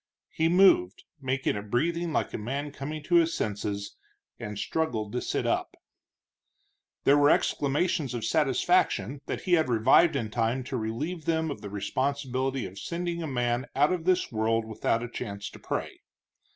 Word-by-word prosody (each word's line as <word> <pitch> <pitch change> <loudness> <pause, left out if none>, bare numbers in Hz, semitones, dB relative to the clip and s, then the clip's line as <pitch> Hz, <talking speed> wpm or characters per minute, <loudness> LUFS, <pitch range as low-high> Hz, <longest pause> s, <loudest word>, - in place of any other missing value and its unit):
He 160 +1 +1
moved, 170 - +4 0.2
making 130 -2 0
a 100 - -3
breathing 165 +11 -1
like - - -1
a - - -2
man 140 +7 -3
coming 150 +2 -6
to 175 +3 +3
his 165 0 +3
senses, 100 -1 -3 0.4
and 105 -2 -6
struggled 110 -6 -2
to 125 - -2
sit - - -2
up. - - -1 1.3
There 145 +1 +5
were 145 0 +5
exclamations 145 -2 +1
of 115 -2 -3
satisfaction 140 - +1
that - - -3
he 180 - -1
had 160 -6 +4
revived 130 +8 +5
in 115 -6 -2
time 115 +3 0
to 130 +1 -5
relieve 145 +9 -3
them 160 -1 0
of - - -7
the 100 - -7
responsibility 130 +5 -2
of 95 +1 -8
sending 170 - -3
a 160 - -3
man 120 -1 -1
out 145 +5 +4
of 170 -3 -3
the 185 0 +4
world 115 0 +1
without 110 +1 -1
a - - -3
chance 100 -4 -6
to - - -12
pray. - - -4
135 Hz, 170 wpm, -28 LUFS, 115-160 Hz, 1.3 s, There